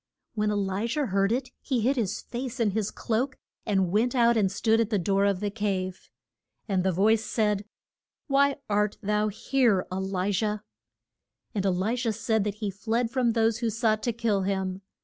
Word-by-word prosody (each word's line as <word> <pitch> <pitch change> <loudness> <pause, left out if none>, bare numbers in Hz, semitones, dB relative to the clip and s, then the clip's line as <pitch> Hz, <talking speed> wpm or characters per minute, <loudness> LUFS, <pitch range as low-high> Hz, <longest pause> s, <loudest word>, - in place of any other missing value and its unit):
When 210 -2 0
E 210 - 0
li 200 +2 -1
jah 285 +5 0
heard 195 -1 +1
it 255 +1 -1
he 255 -5 0
hid 260 +5 +2
his 215 -4 -1
face 250 +1 -5
in 220 -3 +2
his 215 0 -1
cloak, 250 +4 -2 0.3
and 190 -4 +2
went 235 +6 +2
out 235 -1 +4
and 200 -4 +2
stood 220 +3 +2
at 225 -2 +1
the 215 - +1
door 195 +2 +2
of 200 -2 +1
the 205 -1 -1
cave. 195 -3 -3 0.6
And 190 -3 +1
the 190 - +2
voice 215 +5 +3
said, 210 -2 0 0.6
Why 280 -1 +3
art 210 0 +1
thou 210 +1 +1
here, 215 -2 +1
E - - -2
li 190 0 -1
jah? 210 +1 0 0.9
And 195 -2 0
El 190 - +2
li 205 +6 0
jah 240 -2 0
said 220 0 0
that 205 -1 -2
he 210 -2 -3
fled 225 +4 -1
from 245 -3 +2
those 225 0 +2
who 235 -1 0
sought 220 -1 +1
to 240 - 0
kill 225 -3 0
him. 190 -1 -2
210 Hz, 200 wpm, -27 LUFS, 195-230 Hz, 0.9 s, out